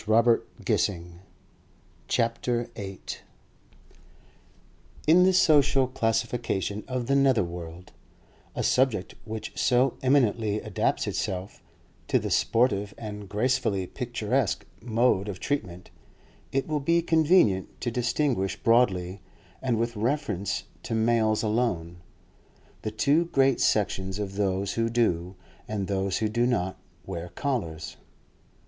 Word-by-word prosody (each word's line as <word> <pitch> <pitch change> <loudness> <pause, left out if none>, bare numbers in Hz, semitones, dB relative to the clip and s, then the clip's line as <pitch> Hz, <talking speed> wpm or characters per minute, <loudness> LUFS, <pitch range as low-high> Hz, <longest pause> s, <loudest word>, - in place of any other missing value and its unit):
CHAPTER 115 +2 +4 0.2
VIII - - +3 1.3
PENNYLOAF 120 +1 0
CANDY 95 -2 -8 2.0
In 165 +4 +6
the 190 - +5
social 145 -6 +4
classification 115 -4 -1
of 130 -2 -2
the 135 +3 +1
nether 135 -5 +4
world—a 85 0 -9
subject 125 -7 +1
which 110 -1 -5
so 125 +1 +2
eminently 115 -6 +2
adapts 105 -3 -1
itself 95 +1 -4 0.5
to - - +3
the - - -3
sportive 105 -4 +1
and 105 -3 -7
gracefully 105 -3 0
picturesque 120 +1 -1 0.2
mode 115 -3 +1
of 95 -3 -6
treatment—it 105 +4 -5
will 155 -1 0
be 170 +4 +2
convenient 160 - +3
to 120 - -1
distinguish 120 -4 0
broadly, 95 -6 +2 0.4
and 125 -3 0
with 115 +1 -1
reference 110 -4 -1 0.2
to 115 - -3
males 110 -1 +2
alone, 105 -7 -1 0.8
the 110 - -2
two 140 +10 +2
great 135 -5 +2
sections 95 -2 +1
of 100 -2 -4
those 100 -1 -1
who 115 0 0
do, 95 -6 0 0.3
and 105 -2 -2
those 95 -1 -1
who 110 - 0
do 120 +3 +1
not, 95 -7 -1 0.3
wear 90 -2 -5
collars. 85 - -3
115 Hz, 115 wpm, -27 LUFS, 95-125 Hz, 2.0 s, In